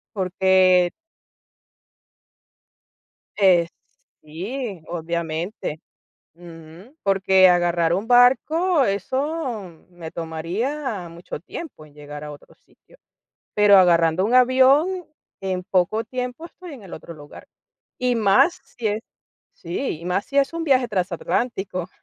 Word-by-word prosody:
Porque 185 -1 +3 2.5
Eh, 180 -4 +4 0.5
sí, 190 - -6
obviamente 170 0 -4 0.5
ujú, 170 - -14
porque 190 -1 +4
agarrar 175 -1 +2
un 200 +5 -2
barco, 275 +6 +4
eso 235 - -3
me 170 -2 -9
tomaría 185 - -4
mucho 170 +2 -8
tiempo 180 - -9
en 145 - -21
llegar 150 0 -9
a 150 - -7
otro 145 - -16
sitio, - - -26 0.6
pero 205 -1 +6
agarrando 170 -1 +4
un 235 +4 +1
avión, 270 +8 +4 0.4
en 185 -1 -3
poco 190 +5 0
tiempo 250 +5 -5
estoy 345 -1 -12
en 250 -6 -12
el 190 - -11
otro 170 - -9
lugar, 145 -1 -13 0.5
y 250 -1 +1
más 215 - +3 0.2
si 230 -3 0
es 210 +1 -2 0.6
Sí, 170 - -4
y - - -11
más 180 +3 -1
si 280 - -7
es 280 +3 +2
un 335 0 -3
viaje 260 -5 +2
transatlántico. 185 0 -2
190 Hz, 115 wpm, -22 LUFS, 170-250 Hz, 2.5 s, pero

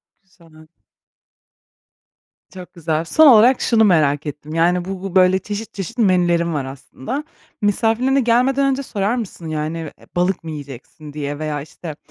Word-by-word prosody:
Çok - - -56 0.3
güzel. 155 0 -18 1.9
Çok 180 -1 -11
güzel. 165 -2 -2
Son 315 - +5
olarak 245 0 +6
şunu 225 -2 +3
merak 155 -7 +2
ettim, 150 +1 -7
yani, 175 +2 +2
bu 190 -1 -6
bu, 195 -1 -6
böyle, 185 0 +5
çeşit, 210 +3 -6
çeşit 195 +5 -6
menülerin 175 -5 +2
var 140 -3 -2
aslında. 135 - -6 0.4
Misafirlerine 225 +6 +1
gelmeden 255 +3 +2
önce 270 +1 -2
sorar 205 -2 -1
mısın, 200 -8 -6
yani, 155 +1 -3 0.2
eee, - - -20
balık 180 0 0
mı 160 - -6
yiyeceksin 145 +1 -10
diye 145 -1 -5
veya, 155 -2 -3
işte, 155 +1 -9
180 Hz, 155 wpm, -19 LUFS, 155-220 Hz, 1.9 s, olarak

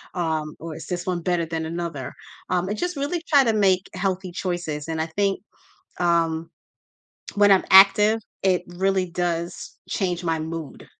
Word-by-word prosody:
um, 160 -3 -2
or, 165 -1 -7
"Is - - -9
this 175 -1 -3
one 180 -2 -2
better 175 -1 0
than 160 0 -3
another", 165 -5 -5 0.4
um, 180 0 0
and 210 - -2
just 355 +2 -2
really 290 +5 -2
try 285 -3 +6
to 225 -3 +2
make 190 -3 +2
healthy 185 -1 -2
choices, 175 -5 -3
and 160 -1 -3
I - - 0
think, 200 -1 +1 0.6
um, 165 -2 +1 0.9
when 205 0 +5
I'm 190 - +4
active, 210 +3 +7 0.2
it 185 -2 +2
really 190 +1 0
does 170 0 -3
change 180 -3 -1
my 165 -1 0
mood, 160 -1 -6
180 Hz, 165 wpm, -23 LUFS, 165-195 Hz, 0.9 s, active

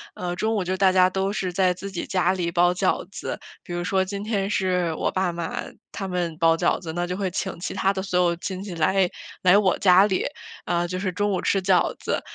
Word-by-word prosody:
呃， 175 -1 -3
中 220 +4 0
午 200 - 0
就 185 +1 -1
大 190 0 +4
家 185 -1 +5
都 195 +1 -1
是 185 -3 -3
在 185 0 +3
自 195 +2 -8
己 185 - -4
家 185 -1 +2
里 175 -2 -2
包 175 +1 +3
饺 185 +1 0
子， - - -5 0.2
比 - - -11
如 175 - -2
说 190 +1 +1
今 200 +1 -5
天 200 -3 -1
是 180 -4 +1
我 - - -1
爸 185 -2 0
妈 170 -1 -4 0.3
他 195 - -5
们 175 -3 -2
包 165 -1 +4
饺 175 - +1
子， 160 -3 -6
那 175 +1 -1
就 180 +1 -3
会 195 -1 -1
请 185 -1 -4
其 - - -4
他 195 +1 +2
的 190 - -3
所 185 -2 0
有 170 -1 +2
亲 185 +1 -5
戚 195 -3 -6
来， 185 +3 +2 0.4
来 180 +1 +6
我 195 -3 +3
家 185 0 +6
里， 190 - 0 0.4
呃， 175 0 0
就 185 - -4
是 185 0 -2
中 205 +3 0
午 185 - 0
吃 195 - +1
饺 185 -2 +2
子。 - - -2
185 Hz, 260 characters per minute, -24 LUFS, 175-195 Hz, 0.4 s, 来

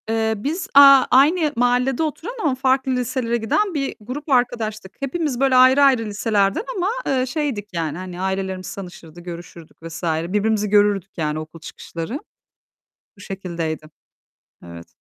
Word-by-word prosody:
Eee, 225 0 +1
biz, 320 - -3
aaa, 275 -1 +8
aynı 300 +3 +4
mahallede 245 +4 +1
oturan 320 +8 -4
ama 285 -5 +1
farklı 265 0 +1
liselere 250 -1 -1
giden 350 - 0
bir 275 -3 -2
grup 275 +8 -7
arkadaştık. 225 -6 -1
Hepimiz, 275 -1 -2
böyle, 270 -1 +3
ayrı 260 +2 +6
ayrı 260 -5 +4
liselerden, 205 - 0
ama, 370 +1 0 0.2
eee, 255 -1 +1
şeydik, 260 -7 -3
yani, 160 -2 -3
hani, 180 -1 -7
ailelerimiz 190 -1 -3
tanışırdı, 175 -3 -10
görüşürdük 170 -2 -11
vs. 165 +2 -8
Birbirimizi 205 +6 0
görürdük, 205 -2 +2
yani, 155 -1 -2
okul 155 +1 -10
çıkışları. 170 - -7 1.0
Bu - - -18
şekildeydi. 170 -6 -5 0.8
Evet. 85 -1 -11
220 Hz, 140 wpm, -21 LUFS, 185-270 Hz, 1.0 s, aaa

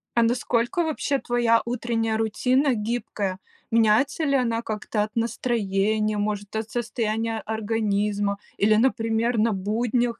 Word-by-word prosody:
А 235 - +4
насколько, 240 +6 +1
вообще, 300 -3 -1
твоя 240 -2 +2
утренняя 230 -2 -1
рутина 250 +5 +2
гибкая? 210 -4 -3 0.3
Меняется 230 +7 +3
ли 280 -1 +2
она 230 -3 +1
как-то 215 -1 -3
от 210 0 -7
настроения, 215 -2 0
может, 205 0 -3
от 220 0 -3
состояния 225 -1 -2
организма 210 -2 -1 0.2
или, 215 +2 +4
например, 225 0 +1
на 220 +1 +3
буднях 230 +4 0
225 Hz, 125 wpm, -24 LUFS, 215-240 Hz, 0.3 s, А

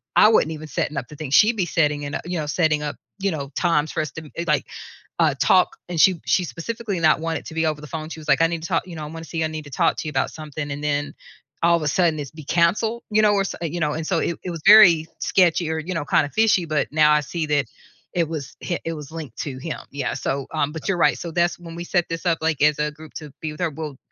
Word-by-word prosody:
I 210 - +7
wasn't 160 -8 +3
even 155 0 -8
setting 145 +1 -2
up 125 - -3
the 150 - -10
thing. 150 -4 -6
She'd 220 +7 +5
be 185 - +1
setting 150 -3 +1
it 145 - -5
u - - -1
you 175 -1 -3
know, 150 - -2
setting 155 -1 +1
up, 145 - -3 0.2
you 195 -1 0
know, 140 -3 -5
times 155 -4 +1
for - - -3
us 150 - -4
to 160 -1 -9
eh, 170 - -2
like, 150 -1 +1 0.5
uh, 160 -4 +4
talk 185 -1 +4
and 170 -3 -3
she 185 -2 +5
she 185 - +2
specifically 210 +3 -4
not 155 0 +4
want 165 0 -2
it - - -18
to - - -8
be 160 0 +1
over 155 -1 -1
the 150 - -9
phone. 155 0 -5
She 160 - -7
was 150 - -13
like, 140 +3 +4
"I 165 - +6
need 165 -1 -4
to 165 - -5
talk," - - 0
you 170 - -8
know, 155 - -6
"I - - -5
want 165 +2 -8
to - - -16
see 160 -1 -1
I - - +1
need 155 -1 -6
to 145 - -12
talk - - +1
to 155 - -4
you - - -3
about 135 -2 0
something," 150 -2 -6
and 145 +1 -5
then 145 -1 -1 0.5
all 170 0 +5
of 170 - -1
a 150 - -1
sudden 165 -1 +2
it's 140 -2 -6
be 155 -1 -11
canceled, 210 +9 +1
you 215 +1 +4
know, 210 -1 +4
where 195 -1 +2
so, - - -5
uh, 170 - -2
you 170 +2 -3
know, 150 -1 +1
and 160 0 -4
so 170 -4 +1
it 170 - -1
it 180 - -4
was 165 - -6
very 180 -7 +8
sketchy 170 -3 +2
or, 160 - -1
you 175 +4 -4
know, 165 -4 -2
kinda 145 0 +2
fishy, 215 -3 +3
but 155 -3 0
now 155 -1 +5
I 150 - +5
see 155 +2 -4
that 145 -3 +1 0.5
it 170 -3 0
was 155 -4 -6
hi 175 - -2
it 165 - -2
was 150 -2 -8
linked 155 -8 -7
to 135 -3 -4
him. 155 +3 -5
Yeah, 140 - -2
so, 135 0 -2
um, 150 -2 0
but 160 -1 -7
you're 195 - +2
right. - - +3
So 170 - -5
that's 175 +1 +1
when 165 -1 -10
we 170 - -5
set 175 -1 +1
this 165 +2 -5
up 165 -2 +2
like 160 -3 0
as 150 0 +4
a 150 - +1
group 155 0 -14
to 150 -2 -7
be 155 -1 -3
with 150 - -13
her. 175 - +1
Well, 150 -2 -6
160 Hz, 305 wpm, -22 LUFS, 150-170 Hz, 0.5 s, very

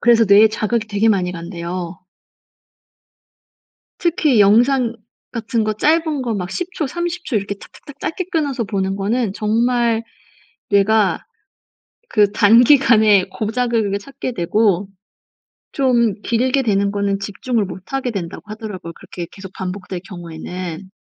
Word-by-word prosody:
그래서 235 -1 +5
뇌에 205 +2 +7
자극이 215 +1 -1
되게 215 +2 +2
많이 185 -4 +1
간대요. 170 0 -6 2.0
특히 305 - +2
영상 235 +4 +4 0.4
같은 230 -1 -1
거 215 0 0
짧은 310 +4 +1
거 235 -3 -2
막 180 -2 -4
10 360 +1 -4
초, 305 - -2
30 345 +4 -4
초 245 - -2
이렇게 200 0 -1
탁탁탁 285 +7 -14
짧게 370 +3 -3
끊어서 285 -7 0
보는 195 -2 -2
거는 205 +1 -1
정말 230 +1 +1 0.7
'뇌가 200 0 +2 0.8
그 205 -2 +3
단기간에 220 -2 +5
고작을 230 +1 0
그렇게 200 0 -1
찾게 270 +2 -6
되고 195 +1 +1 0.8
좀 240 - +2
길게 255 +3 +1
되는 200 -3 +1
거는 200 -1 -1
집중을 215 +2 -2
못 185 +5 -10
하게 260 -2 -1
된다.'고 180 -5 -5
하더라고요 210 -6 -7
그렇게 175 -2 -8
계속 190 -1 -10
반복될 185 -1 -5
경우에는. 175 +1 -7
215 Hz, 270 characters per minute, -19 LUFS, 195-245 Hz, 2.0 s, 뇌에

